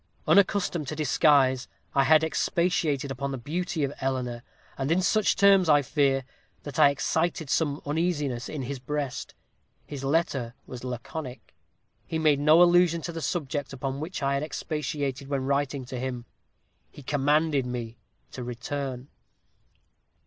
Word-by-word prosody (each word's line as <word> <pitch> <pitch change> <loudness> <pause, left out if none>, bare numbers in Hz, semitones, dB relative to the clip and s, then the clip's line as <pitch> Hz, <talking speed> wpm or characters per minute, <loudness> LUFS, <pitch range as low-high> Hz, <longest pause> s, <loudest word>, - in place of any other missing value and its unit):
Unaccustomed 185 -6 +3
to 155 - -4
disguise, 140 -4 +3 0.3
I 135 -1 +3
had 155 +2 +5
expatiated 160 -4 0
upon 140 +1 -3
the 135 - -3
beauty 165 +5 -3
of 140 0 -1
Eleanor, 125 -3 -2 0.3
and 135 +3 -2
in 170 - +3
such 210 +3 +2
terms, 195 -3 +5
I 145 -1 +5
fear, 135 -1 +1 0.4
that 145 0 -6
I 145 -2 +8
excited 160 +1 -1
some 145 -3 0
uneasiness 145 -5 -1
in 150 -4 -4
his 135 +1 -5
breast. 140 0 -4 0.5
His 140 -2 -7
letter 135 -5 0
was 125 -1 -9
laconic. 125 +2 -7 0.5
He 160 - -2
made 155 -3 +3
no 155 +4 +6
allusion 175 -1 +4
to 170 - -4
the 165 -1 -6
subject 145 -4 -3
upon 135 0 -4
which 160 0 -5
I 140 0 +1
had 140 - 0
expatiated 145 -3 -3
when 135 -2 -2
writing 140 -1 -1
to 125 0 -6
him. 125 -2 -4 0.6
He 145 - -13
commanded 145 0 +1
me 120 -2 -5 0.3
to 125 - -6
return. 125 +2 -5
145 Hz, 150 wpm, -27 LUFS, 130-160 Hz, 0.6 s, I